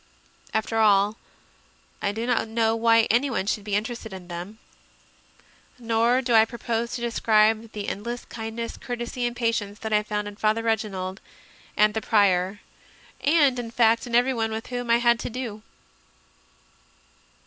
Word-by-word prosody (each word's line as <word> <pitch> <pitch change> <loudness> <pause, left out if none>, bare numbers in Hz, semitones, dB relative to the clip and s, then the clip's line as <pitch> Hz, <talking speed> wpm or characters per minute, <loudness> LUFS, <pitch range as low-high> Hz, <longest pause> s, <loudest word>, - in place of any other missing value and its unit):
After 220 +1 -1
all, 205 0 +4 0.8
I 200 - 0
do 225 +3 -4
not 240 -2 +1
know 225 0 +1
why 230 0 +4
anyone 240 -3 +1
should 210 0 -1
be 205 -1 -2
interested 220 +1 -3
in 185 -2 -10
them. 175 +5 -7 1.2
Nor 235 +2 +1
do 240 -1 0
I 220 -1 +7
propose 235 +1 -3
to 245 - -5
describe 220 -1 +2
the 210 -1 -5
endless 235 +5 -4
kindness, 225 0 -6
courtesy, 245 0 -3
and 240 - -5
patience 230 -4 -1
that 220 -1 -4
I 210 - +4
found 210 -1 -3
in 205 0 -9
Father 215 +1 +1
Reginald 200 -4 -2 0.6
and 210 0 +4
the 220 - -2
Prior, 200 -2 +2 0.6
and, 285 -4 +4
in 235 -1 -5
fact, 230 0 +2
in 235 - -2
everyone 240 -2 +2
with 220 +1 -4
whom 245 -1 -3
I 235 - +5
had 235 -1 +3
to - - -4
do. 235 -3 -6
225 Hz, 155 wpm, -25 LUFS, 210-235 Hz, 1.2 s, I